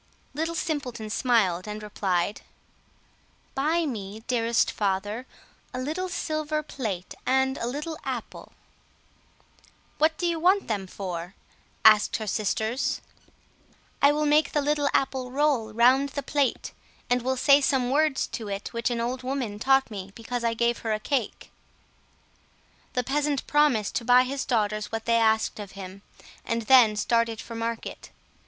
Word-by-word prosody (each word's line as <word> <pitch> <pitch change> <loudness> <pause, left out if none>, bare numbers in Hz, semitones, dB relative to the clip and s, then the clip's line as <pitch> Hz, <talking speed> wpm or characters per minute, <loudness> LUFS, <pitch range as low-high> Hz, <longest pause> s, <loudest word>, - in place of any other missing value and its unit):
Little 325 +4 -2
Simpleton 260 -10 -3
smiled 210 -7 +1
and 210 0 -6
replied— 195 -2 -1 1.1
"Buy 315 +5 +1
me, 215 -5 -5
dearest 230 -1 +1
father, 205 +5 -2 0.5
a - - -3
little 320 +8 -3
silver 310 -3 -2
plate 215 -11 -5
and 265 +1 +2
a 235 - -2
little 300 +5 -4
apple." - - -6 1.5
"What 315 +1 +3
do 355 - -2
you 340 -1 0
want 375 +4 +3
them 200 -4 -2
for?" 180 -1 -6 0.5
asked 215 -1 +6
her 220 - -3
sisters. 220 +4 -1 1.0
"I 280 - +7
will 300 +1 0
make 300 0 +3
the 295 - +2
little 290 0 +1
apple 265 -2 0
roll 270 -5 +1
round 255 +5 +4
the 285 0 -4
plate, 280 -1 0 0.4
and 245 0 +2
will 260 +2 -1
say 280 +2 +5
some 260 -3 +1
words 300 0 +2
to 225 -3 -6
it 200 0 -5
which 235 +1 0
an 240 -1 -2
old 250 +2 -2
woman 255 -5 -3
taught 270 +1 +3
me 195 -2 -7
because 235 +1 -4
I 230 -1 +1
gave 235 +1 +1
her 220 -1 -1
a 215 - -1
cake." 250 +1 -3 1.4
The 250 - 0
peasant 285 +2 -1
promised 295 -9 +2
to - - -3
buy 250 +1 +6
his 270 +2 -3
daughters 215 -4 0
what 225 0 -4
they 230 0 +3
asked 220 -1 +2
of 205 -2 -8
him, 190 0 -9 0.4
and 230 +1 -2
then 230 -2 +6
started 230 +1 +1
for 230 - -8
market. 230 0 -5
245 Hz, 150 wpm, -26 LUFS, 215-280 Hz, 1.5 s, I